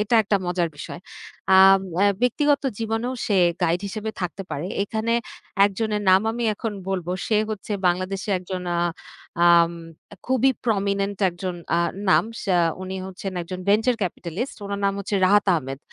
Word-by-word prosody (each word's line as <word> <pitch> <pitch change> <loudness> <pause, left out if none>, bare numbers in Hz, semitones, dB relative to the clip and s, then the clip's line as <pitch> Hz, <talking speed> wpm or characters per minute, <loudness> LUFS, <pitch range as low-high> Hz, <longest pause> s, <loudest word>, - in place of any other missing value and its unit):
এটা 210 +3 0
একটা 205 0 +1
মজার 175 -1 0
বিষয়। 155 +3 -8 0.6
আম 195 0 +7 0.2
অ্যা 200 +3 +4 0.2
ব্যক্তিগত 285 +4 +2 0.2
জীবনেও 225 +2 -2
সে 205 - +1 0.3
গাইড 170 +2 +2
হিসেবে 215 +2 -4
থাকতে 180 +2 -4
পারে। 145 +5 -3 0.2
এখানে 220 +2 -2 0.5
একজনের 210 +1 -1
নাম 185 +1 +6
আমি 235 +1 -3
এখন 225 0 -4 0.2
বলব। 185 -3 -2 0.2
সে 220 - +2
হচ্ছে 210 0 -5
বাংলাদেশে 185 +3 -1
একজন 180 0 -6
আ - - 0 0.7
আম 170 0 +6 0.5
খুবই 260 +1 +3
প্রমিনেন্ট 200 -2 0
একজন 180 +1 -5 0.2
আ - - +3 0.3
নাম। - - +5 0.2
সে 195 - 0 0.3
উনি 190 0 -5
হচ্ছেন 190 +1 -6
একজন 180 +2 -6
ভেঞ্চার 220 +5 +3
ক্যাপিটালিস্ট 185 - -4
উনার 200 0 -4
নাম 195 - +2
হচ্ছে 200 +1 -3
রাহাত 205 +1 +4
আহমেদ। 135 -4 -3
195 Hz, 155 wpm, -23 LUFS, 180-220 Hz, 0.7 s, আম